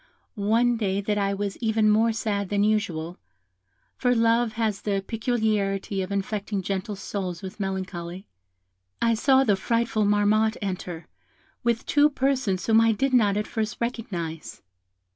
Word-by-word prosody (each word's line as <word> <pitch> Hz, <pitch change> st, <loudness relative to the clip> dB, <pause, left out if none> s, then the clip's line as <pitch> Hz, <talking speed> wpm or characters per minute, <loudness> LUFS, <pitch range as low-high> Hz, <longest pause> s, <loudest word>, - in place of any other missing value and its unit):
One 230 Hz, +3 st, +2 dB
day 200 Hz, -3 st, 0 dB
that 205 Hz, +1 st, -1 dB
I 200 Hz, 0 st, 0 dB
was 200 Hz, 0 st, -3 dB
even 220 Hz, -2 st, +1 dB
more 220 Hz, +2 st, +4 dB
sad 205 Hz, -3 st, -2 dB
than 205 Hz, 0 st, +1 dB
usual 180 Hz, -6 st, -1 dB, 0.8 s
for 245 Hz, -1 st, +1 dB
love 230 Hz, 0 st, +2 dB
has 220 Hz, -3 st, -1 dB
the 200 Hz, -2 st, -1 dB
peculiarity 215 Hz, -4 st, -1 dB
of 185 Hz, +1 st, -5 dB
infecting 200 Hz, 0 st, -2 dB
gentle 200 Hz, +2 st, -3 dB
souls 185 Hz, -3 st, -5 dB
with 190 Hz, +2 st, -8 dB
melancholy 190 Hz, -2 st, -4 dB, 0.7 s
I 230 Hz, 0 st, +3 dB
saw 265 Hz, +4 st, +4 dB
the 210 Hz, -6 st, +3 dB
frightful 230 Hz, +1 st, 0 dB
Marmotte 210 Hz, +2 st, +2 dB
enter, 180 Hz, -4 st, -5 dB, 0.6 s
with 235 Hz, 0 st, 0 dB
two 295 Hz, 0 st, +4 dB
persons 260 Hz, -9 st, 0 dB
whom 225 Hz, 0 st, +5 dB
I 225 Hz, 0 st, +4 dB
did 270 Hz, +5 st, 0 dB
not 210 Hz, -5 st, +4 dB
at 210 Hz, -, -1 dB
first 215 Hz, -1 st, -3 dB
recognise. 180 Hz, -9 st, -4 dB
210 Hz, 145 wpm, -25 LUFS, 195-230 Hz, 0.8 s, whom